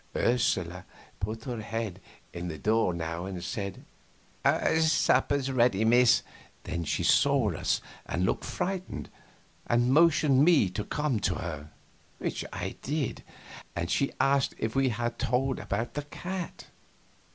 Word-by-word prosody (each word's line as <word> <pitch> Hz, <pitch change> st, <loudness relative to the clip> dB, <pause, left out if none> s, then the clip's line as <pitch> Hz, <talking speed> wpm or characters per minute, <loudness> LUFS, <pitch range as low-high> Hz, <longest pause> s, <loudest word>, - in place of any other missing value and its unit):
Ursula 95 Hz, -7 st, +1 dB, 0.4 s
put 110 Hz, +3 st, -4 dB
her 120 Hz, -4 st, -4 dB
head 110 Hz, -4 st, -4 dB, 0.3 s
in 85 Hz, 0 st, -5 dB
at -, -, -3 dB
the 80 Hz, -, -5 dB
door 110 Hz, 0 st, +2 dB
now 85 Hz, +1 st, -4 dB
and 90 Hz, -3 st, -5 dB
said: 100 Hz, 0 st, -5 dB, 0.9 s
"Supper's 145 Hz, -3 st, +2 dB
ready, 120 Hz, -4 st, +3 dB
miss." 120 Hz, +1 st, +5 dB, 0.4 s
Then 85 Hz, -1 st, -3 dB
she -, -, -1 dB
saw 140 Hz, -7 st, +4 dB
us -, -, 0 dB, 0.3 s
and 90 Hz, +2 st, 0 dB
looked -, -, 0 dB
frightened, 185 Hz, 0 st, -4 dB, 0.6 s
and 120 Hz, +2 st, +3 dB
motioned 150 Hz, -3 st, +5 dB
me 150 Hz, -, +5 dB
to 100 Hz, +3 st, -3 dB
come 150 Hz, -4 st, -1 dB
to 90 Hz, -3 st, 0 dB
her, 75 Hz, -4 st, -5 dB, 0.5 s
which -, -, -3 dB
I -, -, -5 dB
did, 145 Hz, -2 st, -2 dB, 0.5 s
and 85 Hz, +1 st, -2 dB
she 140 Hz, -, +1 dB
asked 135 Hz, -1 st, +2 dB
if 110 Hz, 0 st, -3 dB
we 135 Hz, -1 st, +3 dB
had 120 Hz, +1 st, -3 dB
told 130 Hz, +2 st, 0 dB
about 115 Hz, +4 st, -3 dB
the 145 Hz, -, -2 dB
cat. 175 Hz, +5 st, -6 dB
115 Hz, 140 wpm, -29 LUFS, 95-135 Hz, 0.9 s, miss